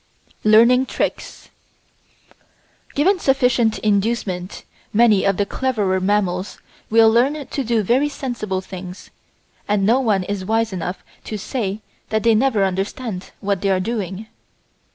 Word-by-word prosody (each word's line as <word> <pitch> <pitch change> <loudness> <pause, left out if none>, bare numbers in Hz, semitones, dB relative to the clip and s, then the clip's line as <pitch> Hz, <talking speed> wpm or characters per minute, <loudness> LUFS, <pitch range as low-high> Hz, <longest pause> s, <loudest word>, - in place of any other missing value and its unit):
Learning 235 +4 +6
Tricks - - -4 1.4
Given 365 +7 +3
sufficient 250 -6 +2
inducement 200 -3 -1 0.3
many 215 -3 +4
of 195 -1 +2
the 205 - +1
cleverer 205 -6 -1
mammals 190 -1 -1 0.3
will 225 0 +6
learn 265 +6 +2
to 275 - -3
do 230 -2 +1
very 260 +8 +2
sensible 230 -9 -4
things, 185 -1 -10 0.6
and 205 -1 +1
no 235 +5 +4
one 210 -7 +1
is 200 0 -4
wise 225 +1 0
enough 180 +1 -5 0.2
to 215 - -4
say 210 -1 -3 0.3
that 220 0 0
they 230 -1 +4
never 225 -2 +2
understand 195 +2 -4
what 200 -2 -1
they 200 - 0
are 190 -1 +2
doing. 200 -1 -4
215 Hz, 130 wpm, -20 LUFS, 195-240 Hz, 1.4 s, Learning